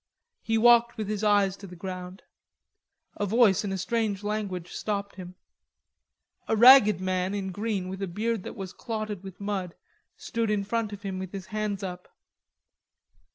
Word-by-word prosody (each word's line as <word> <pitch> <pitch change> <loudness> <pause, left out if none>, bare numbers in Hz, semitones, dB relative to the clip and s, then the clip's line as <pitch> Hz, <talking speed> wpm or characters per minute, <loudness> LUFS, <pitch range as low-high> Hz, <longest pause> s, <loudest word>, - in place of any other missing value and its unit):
He 225 0 0
walked 235 +1 +5
with 215 -2 -3
his 210 0 -3
eyes 205 -2 +3
to 200 - -10
the 180 - -11
ground. 185 +1 -7 0.9
A 205 - -1
voice 220 -2 +4
in 200 - -3
a 190 - -2
strange 210 0 -1
language 200 -5 -3
stopped 200 -1 -3
him. 185 -1 -9 1.1
A - - +2
ragged 220 -4 +8
man 185 +1 -1
in 190 -2 -3
green 205 -1 -2
with 190 +1 -6
a 195 - -1
beard 215 +4 -2
that - - -8
was 195 -1 -7
clotted 215 -5 -5
with 190 -2 -10
mud 200 -4 -3 0.4
stood 230 -1 -2
in 210 -1 +1
front 220 +1 -2
of 205 0 -9
him 190 -2 -4
with 190 -1 -6
his 195 -2 -6
hands 210 -2 -2
up. 180 -1 -6
200 Hz, 170 wpm, -27 LUFS, 185-215 Hz, 1.1 s, ragged